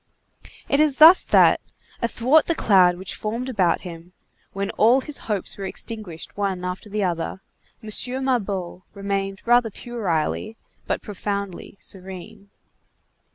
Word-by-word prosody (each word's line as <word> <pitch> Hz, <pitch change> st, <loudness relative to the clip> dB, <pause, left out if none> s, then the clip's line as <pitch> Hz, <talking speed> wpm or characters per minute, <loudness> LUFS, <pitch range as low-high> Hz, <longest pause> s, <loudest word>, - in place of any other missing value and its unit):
It 280 Hz, -, +2 dB
is 300 Hz, -3 st, +3 dB
thus 325 Hz, +4 st, +9 dB
that, -, -, +5 dB, 0.4 s
athwart 255 Hz, +6 st, +3 dB
the 335 Hz, -, +1 dB
cloud 185 Hz, -, +4 dB
which 185 Hz, +1 st, -4 dB
formed 230 Hz, +4 st, -4 dB
about 185 Hz, -8 st, +1 dB
him, 175 Hz, 0 st, -10 dB, 0.4 s
when 195 Hz, 0 st, -3 dB
all 240 Hz, +5 st, +4 dB
his 295 Hz, +1 st, -5 dB
hopes 205 Hz, -4 st, -2 dB
were -, -, -5 dB
extinguished 190 Hz, -4 st, -6 dB
one 195 Hz, -3 st, -2 dB
after 180 Hz, +3 st, -5 dB
the 210 Hz, 0 st, -1 dB
other, 175 Hz, 0 st, -2 dB, 0.4 s
M. 215 Hz, -, -8 dB, 0.4 s
Mabeuf 195 Hz, -8 st, -2 dB
remained 195 Hz, -1 st, -3 dB
rather 240 Hz, -1 st, +4 dB
puerilely, 215 Hz, -1 st, -3 dB, 0.3 s
but -, -, -2 dB
profoundly 200 Hz, -2 st, -5 dB
serene. 190 Hz, +1 st, -9 dB
200 Hz, 130 wpm, -23 LUFS, 185-235 Hz, 0.4 s, thus